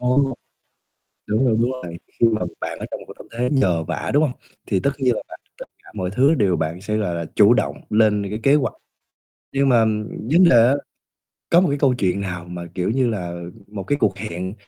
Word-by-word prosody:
Ừ. 125 - -3 1.2
Đúng 110 +5 +1
rồi, 115 -3 +3
đúng 120 +2 +2
rồi, 85 -1 -7 0.2
khi 115 - +6
mà 110 -3 0 0.2
bạn - - -5
ở - - -5
trong - - -4
một - - -10
tâm - - -13
thế 125 +1 +1
nhờ 90 - +2
vả, 80 0 -3
đúng 145 +2 +4
hông? 145 - +1 0.4
Thì 95 - +1
tất 140 - +1
nhiên 125 -4 +2
là - - -3
làm - - -10 0.2
tất - - -7 0.2
cả - - -16
mọi 95 -3 -2
thứ 135 +9 +4
đều 95 -8 +2
bạn 80 +3 -3
sẽ 105 +1 -2
là 95 -5 -1
là 85 -1 -3
chủ 105 +2 +6
động 125 - 0
lên 105 -2 +2
cái 105 +2 -4
kế 140 +1 +5
hoạch. 140 -4 0 0.8
Nhưng 140 0 +2
mà 115 -3 +5 0.5
vấn 175 +4 +6
đề - - +5
á 130 - +4 0.8
có 170 - +6
một 185 - +2
cái 140 - -1
câu 135 -3 +3
chuyện 100 -4 0
nào 90 -3 -4
mà, 90 0 -7
kiểu 90 +2 -1
như 130 0 +1
là, 90 -5 -4 0.3
một 100 -1 -7
cái 145 +9 -1
cuộc 110 -7 +1
hẹn 95 -1 -5
105 Hz, 230 wpm, -21 LUFS, 90-130 Hz, 1.2 s, khi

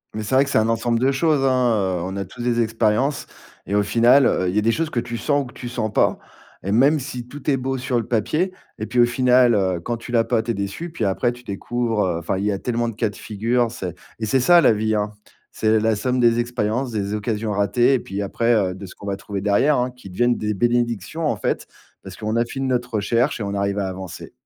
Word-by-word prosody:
Mais 110 - -3
c'est 105 - -4
vrai 135 - +6
que 140 - -5
c'est - - +1
un 110 +1 +2
ensemble 115 +1 +1
de 130 +3 +3
choses, 145 0 +2
hein. 115 -8 +2
Heu, - - -5
on 95 +2 -4
a 100 - -3
tous 120 +7 -11
des 120 -1 +1
expériences 115 +5 0 0.4
et 100 - -1
au 105 - +3
final, 120 +6 +5
heu, 90 -5 +1
il 90 - -3
y - - +1
a - - +4
des 115 +2 +2
choses 160 +6 -1
que 125 - -1
tu 120 0 -4
sens 145 +3 +1
ou - - -9
que 125 - -12
tu 120 - -7
sens 120 -3 -2
pas. - - +2 0.5
Et 100 - -2
même 140 +8 +4
si, 125 -3 -6
tout 145 +3 -6
est 135 - +3
beau 130 +1 -2
sur 125 -1 -1
le 115 - -4
papier 155 - 0 0.3
et 110 - -3
puis 125 - -1
au 120 - +7
final, 125 0 +4
heu, 95 -4 +1
quand 115 +8 -3
tu 115 - -10
l'as 115 -2 +3
pas, 115 -1 +1
tu 115 - -9
es - - -1
déçu. 100 - -4
Puis 155 -9 -2
après, 100 +5 +1
tu 120 0 -12
découvres, 115 +1 -2
heu, 90 -3 -1
enfin, 85 +3 -2
il 100 - -2
y 105 - +2
a 100 - -1
tellement 120 +2 -1
de 115 - -8
cas 110 - 0
de 105 - -12
figure, 115 +3 -1
c'est 90 -7 -5 0.3
et 110 - -2
c'est 120 +5 +2
ça 175 +7 +6
la 130 - +5
vie, 110 +1 0
hein. 105 0 -1 0.4
C'est 110 0 +2
la 110 0 +2
somme 125 +4 -1
des 120 -1 +4
expériences, 120 +1 -1
des 100 -2 -2
occasions 105 +1 -2
ratées, 105 +6 +2
et - - 0
puis 100 -2 -5
après, 115 +4 +1
heu, 95 -4 +1
de 95 +2 -9
ce - - -13
qu'on - - -12
va 100 - -1
trouver 100 0 -6
derrière, 105 +9 +3
hein, 125 +1 0
qui 125 -6 -13
deviennent 120 +6 +1
des 105 0 -2
bénédictions, 120 - 0
en - - 0
fait, - - -2 0.4
parce - - -9
qu'on 110 +1 -2
a 115 0 +2
fini 135 +3 -4
notre 125 -2 -1
recherche 115 +7 +1
et - - -3
on 100 0 -3
arrive 100 0 -1
à 100 - -1
avancer. 95 -1 -8
115 Hz, 270 wpm, -22 LUFS, 105-125 Hz, 0.5 s, au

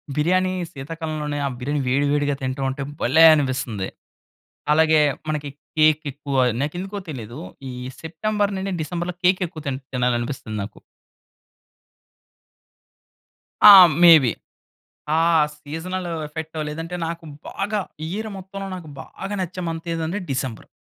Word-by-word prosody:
బిర్యానీ 185 +4 +2 0.2
శీతాకాలంలోనే 150 0 -4
ఆ - - +1
బిర్యానీ 145 +3 -1
వేడి, 140 +3 +2
వేడిగా 145 -1 +1
తింటా 130 +1 -3
ఉంటే 135 +1 -4 0.2
భలే 160 +7 +5
అనిపిస్తుంది. 130 -9 -1 0.9
అలాగే 160 0 +5 0.3
మనకి 150 -2 -2 0.3
కేక్ 155 0 +4
ఎక్కువ 140 -1 -4 0.2
నాకెందుకో 180 +7 -3
తెలీదు 120 -3 -7 0.3
ఈ - - -6 0.3
సెప్టెంబర్ 205 +5 -1
నుండి 195 0 -3
డిసెంబర్‌లో 175 +2 -3
కేక్ 185 +1 +4
ఎక్కువ 160 -3 -10
తిన్ 135 0 -2
తినాలనిపిస్తుంది 125 -2 -1
నాకు. 100 - -9 2.9
ఆ! - - +13 0.3
మేబీ. 155 -9 +8 0.8
ఆ - - +3 0.4
సీజనల్ 175 +5 -5 0.2
ఎఫెక్టో 160 +1 -6
లేదంటే, 165 +3 -5
నాకు 165 0 -6 0.2
బాగా 205 +1 -2 0.3
ఇయర్ 215 +5 -4
మొత్తంలో 195 +1 -7
నాకు 165 -4 -9
బాగా 200 +1 -7
నచ్చే 180 +1 -4
మంత్ 165 +1 -4
ఏందంటే 165 +5 -2
డిసెంబర్. 130 -4 -4
155 Hz, 120 wpm, -22 LUFS, 140-180 Hz, 2.9 s, ఆ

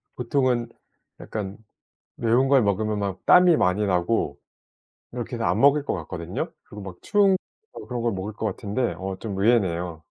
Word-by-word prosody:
보통은 125 -1 0 0.5
약간 100 -2 -5 0.6
매운 120 +3 +2
걸 135 -2 +5
먹으면 105 +1 0
막 100 -2 -4
땀이 180 -2 +7
많이 90 0 +2
나고 90 -4 0 0.7
이렇게 120 0 -5
해서 115 -1 -2
안 - - +1
먹을 140 +1 +5
것 - - -2
같거든요. 85 -5 -5
그리고 105 - -11
막 95 -2 -8
추운 200 -2 +3 0.4
거 - - -9
그런 125 -1 -3
걸 115 -1 0
먹을 95 +3 -5
것 110 - -5
같은데 105 +4 -2
어 95 0 -5
좀 100 -4 -5
의외네요. 90 -6 +1
110 Hz, 315 characters per minute, -24 LUFS, 95-125 Hz, 0.7 s, 땀이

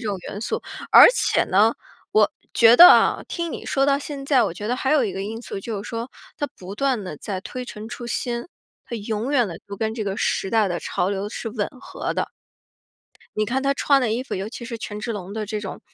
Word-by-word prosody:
种 200 - -1
元 205 - -6
素。 - - -3 0.3
而 - - +11
且 - - +2
呢， 210 +5 +3 0.4
我 215 -1 +4 0.2
觉 230 0 +7
得 350 +5 +12
啊， - - +4
听 340 -3 -3
你 - - -7
说 275 0 +1
到 280 0 +3
现 285 -1 -7
在， 275 -3 +4
我 170 - -3
觉 210 - -6
得 245 - +1
还 265 +2 0
有 295 -5 +4
一 200 - -2
个 195 - -4
因 220 +3 -5
素， 200 - -6
就 205 -1 -5
是 - - -9
说 230 +2 -5 0.3
它 290 - -1
不 185 +2 -8
断 255 -2 0
地 180 -5 -6
在 190 +4 -5
推 250 +6 -6
陈 215 -2 -8
出 240 0 -7
新， 240 0 -3 0.4
它 235 - -5
永 220 +3 -3
远 250 -5 +3
地 170 -2 -7
就 200 - -6
跟 220 +2 -1
这 225 - -3
个 195 -1 -3
时 195 - 0
代 220 -3 +3
的 175 -1 -3
潮 180 - -1
流 200 +1 -3
是 225 - -5
吻 210 -2 -2
合 - - -5
的。 - - -1 1.1
你 215 - +2
看 265 +4 -1
他 275 - +2
穿 275 0 +3
的 230 -4 0
衣 240 - -1
服， 270 - -5
尤 195 +2 -4
其 235 - -8
是 235 0 -5
权 210 -2 -6
志 230 +1 -3
龙 195 -2 -6
的 215 0 -4
这 210 0 -3
种 195 -2 -7
225 Hz, 265 characters per minute, -23 LUFS, 205-250 Hz, 1.1 s, 得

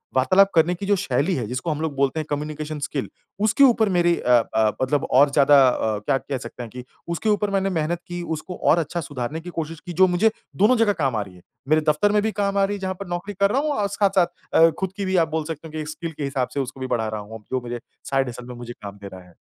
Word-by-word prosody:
वार्तालाप 185 +10 +5
करने 165 +2 +4
की 195 - -6
जो 205 0 +3
शैली 145 +2 0
है 120 -5 -2
जिसको 130 +7 -3
हम 150 +1 -3
लोग 155 -3 -2
बोलते 140 +3 +1
हैं 155 - -3
कम्युनिकेशन 150 +1 -4
स्किल 140 -1 -3 0.3
उसके 225 +6 +4
ऊपर 225 -5 +5
मेरी 175 -1 +3
अ 125 - 0 0.2
अ, 110 -1 +3
मतलब 135 +2 +1
और 140 +2 +6
ज़्यादा 145 0 +6
अ, 110 -4 0
क्या 135 +6 +1
कह 135 0 -4
सकते 125 - -8
हैं 115 - -8
कि 125 0 -8 0.2
उसके 170 +6 -1
ऊपर 210 0 +1
मैंने 195 0 +1
मेहनत 165 0 -1
की, 175 0 -5
उसको 165 +3 -5
और 170 - +3
अच्छा 170 +2 -2
सुधारने 145 +2 -5
की 175 - -8
कोशिश 165 -1 -5
की 175 - -6
जो 185 +2 +5
मुझे 190 +5 +3 0.2
दोनों 220 +6 +4
जगह 215 -3 +3
काम 130 -4 +1
आ 105 - 0
रही 95 -2 -9
है। 90 - -16 0.3
मेरे 155 0 +4
दफ़्तर 180 +8 +3
में 210 0 +3
भी 220 - 0
काम 200 -1 -1
आ 195 - +4
रही 205 +1 -2
है - - -11
जहाँ 190 0 -2
पर 200 - -6
नौकरी 175 +4 -4
कर 200 +1 +4
रहा 270 +3 +2
हूँ 305 0 -1
और 205 -4 0
साथ-साथ 195 -2 +2 0.3
अ, 165 0 +7
ख़ुद 190 0 -2
की 200 - -2
भी 190 0 0
आप - - -14
बोल 160 0 -1
सकते 160 0 -6
हो - - -13
कि 155 -1 -4
स्किल 165 +1 -6
के 150 - -6
हिसाब 135 -2 -1
से 140 - -2
उसको 135 0 -4
भी 130 - -3
बढ़ा 115 -3 0
रहा 110 -1 -4
हूँ, 110 +1 -10
जो 130 -1 0
मेरे 120 0 -5 0.3
साइड 135 -2 +1
हसल 120 +1 -8
में 125 - -8
मुझे 120 0 -8
काम 100 -2 -10
दे 100 0 -9
रहा 95 -1 -10
है। 85 - -22
155 Hz, 280 wpm, -23 LUFS, 130-190 Hz, 0.3 s, अ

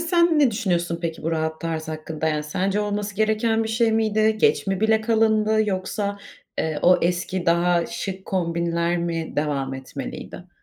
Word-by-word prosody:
Sen 340 -1 +3
ne 280 -4 +5
düşünüyorsun 175 -6 -1
peki 165 -1 -4
bu 165 - -1
rahat 160 0 -2
tarz 160 -1 -3
hakkında, 155 0 -3
yani, 150 -1 -1
sence 195 +6 -1
olması 205 -1 -2
gereken 220 +1 +1
bir - - -3
şey 225 0 +2
miydi? 220 0 +2
Geç - - +3
mi 195 0 -1
bile 220 0 +3
kalındı 220 -1 +2
yoksa, 200 +1 -2 0.4
eee, 155 -2 -1
o 180 +1 +6
eski 180 +1 -1
daha 170 0 +3
şık 195 -4 -5
kombinler 170 -1 0
mi 165 -1 -3
devam 140 -3 -1
etmeliydi? 140 +6 -8
185 Hz, 165 wpm, -23 LUFS, 165-215 Hz, 0.4 s, o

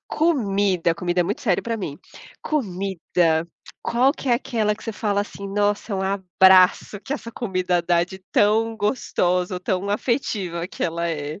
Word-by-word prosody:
Comida, 200 - +1
comida 175 +1 -1
é - - +5
muito 195 +5 -3
sério 195 -7 +1
para 230 -1 -2
mim. 160 -9 -5 0.4
Comida, 180 - 0 0.4
qual 255 +4 +3
que 280 - -6
é 240 - +5
aquela 225 -4 0
que 210 - -14
você 225 - -3
fala 205 -1 0
assim: 200 -1 -8
"Nossa, 205 +2 0
é - - 0
um 190 - -2
abraço 190 0 +4
que 270 - -5
essa 235 -5 -5
comida 185 -6 -1
dá 170 0 +2
de 190 +2 -11
tão 220 +2 +3
gostosa 180 -5 0
ou 180 - -4
tão 190 0 -2
afetiva 205 -7 -1
que - - -4
ela 170 0 -1
é." 150 +1 -4
195 Hz, 175 wpm, -23 LUFS, 180-220 Hz, 0.4 s, é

